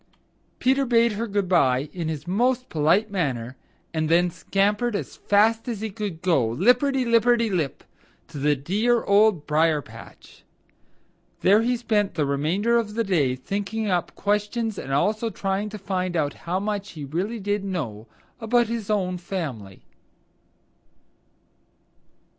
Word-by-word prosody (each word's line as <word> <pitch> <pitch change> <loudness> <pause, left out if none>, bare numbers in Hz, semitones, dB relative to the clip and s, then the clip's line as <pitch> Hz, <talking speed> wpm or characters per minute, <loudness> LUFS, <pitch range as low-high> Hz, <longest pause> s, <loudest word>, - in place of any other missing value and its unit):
Peter 265 +2 +2
bade 235 -2 +3
her 220 +3 -3
good 200 -2 -1
by 135 -6 +2
in 170 -3 -4
his 155 -2 -4
most 250 +6 +1
polite 175 +8 +2
manner 130 -10 -2 0.4
and 155 -1 -1
then 175 +1 +3
scampered 205 +6 0
as - - -4
fast 220 +3 +2
as 230 -4 -3
he 220 0 -4
could 195 -5 -5
go, 170 -8 +3
lipperty 250 - +2
lipperty 235 -1 +3
lip, 160 -8 -2 0.4
to 145 - -8
the 145 +1 +2
dear 210 - +1
Old 200 -5 +3
Briar 155 0 +2
patch. - - -14 1.0
There 205 +3 +5
he 245 +2 +1
spent 210 -5 0
the 155 -3 +1
remainder 170 +12 +1
of 215 -3 -2
the 230 - +1
day 155 - +1
thinking 205 - -3
up 175 -1 -1
questions 210 +1 -1
and 135 - -6
also 215 +11 +1
trying 195 0 -2
to 215 - -7
find 185 -3 -2
out 145 -3 0 0.2
how 185 +2 +1
much 205 0 -3
he 150 -4 -7
really 185 +11 -3
did 205 0 -1
know 130 - -4 0.3
about 240 +1 +2
his 230 -3 -4
own 185 -4 0
family. 140 - -6
200 Hz, 145 wpm, -24 LUFS, 160-225 Hz, 1.0 s, There